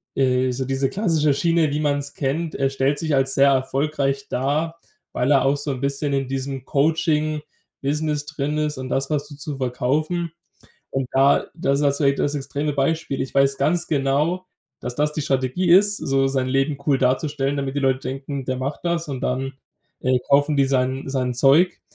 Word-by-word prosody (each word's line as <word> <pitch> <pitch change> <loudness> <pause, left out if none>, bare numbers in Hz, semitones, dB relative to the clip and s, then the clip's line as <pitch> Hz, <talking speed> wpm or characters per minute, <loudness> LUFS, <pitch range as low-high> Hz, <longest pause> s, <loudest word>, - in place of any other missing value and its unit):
äh 130 -1 +2
so 130 +1 -3
diese 135 +1 0
klassische 160 -8 +1
Schiene, 165 -1 +2
wie 150 - -1
man's 145 -1 -1
kennt. 155 +4 -2
Er 135 0 +1
stellt 135 +2 +1
sich 160 -2 -1
als 135 0 +2
sehr 140 0 +5
erfolgreich 135 +1 0
dar, 155 +6 -1 0.3
weil 130 +4 +1
er 135 -2 +4
auch 140 - +3
so 145 0 -3
'n 130 - -4
bisschen 140 +2 -1
in 135 -1 0
diesem 135 0 -4
Coaching-Business 150 -1 -1
drin 150 0 -3
ist 150 -1 -1
und 130 0 -5
das, 135 +1 0
da 155 - +1
so 145 0 -11
zu 145 0 -6
verkaufen. 150 +7 -1 0.6
Und 135 -2 -2
da 135 +1 +4
das 140 -3 0
ist 150 - +1
jetzt 140 0 +2
vielleicht 140 -2 +2
das 145 +1 0
extreme 145 +2 -2
Beispiel. 140 0 -1
Ich 130 - -3
weiß 135 0 +3
ganz 175 +2 +1
genau, 150 +6 0 0.3
dass 125 0 -5
das 150 +1 +1
die 155 - -3
Strategie 135 +7 0
ist, 205 +3 +6
so 135 0 +1
sein 135 -1 0
Leben 135 +2 0
cool 140 -3 +3
darzustellen, 135 +2 0
damit 140 0 -3
die - - +1
Leute 130 -1 +1
denken, 135 0 -5
der 130 0 -2
macht 135 +3 -4
das 170 -2 -1
und 135 -2 -4
dann, 135 +1 -1 0.5
äh, 130 0 +2
kaufen 145 +1 +3
die 140 - +4
sein 130 0 0
sein 130 -2 -1
Zeug. 145 +8 +4
140 Hz, 190 wpm, -22 LUFS, 135-150 Hz, 0.6 s, ist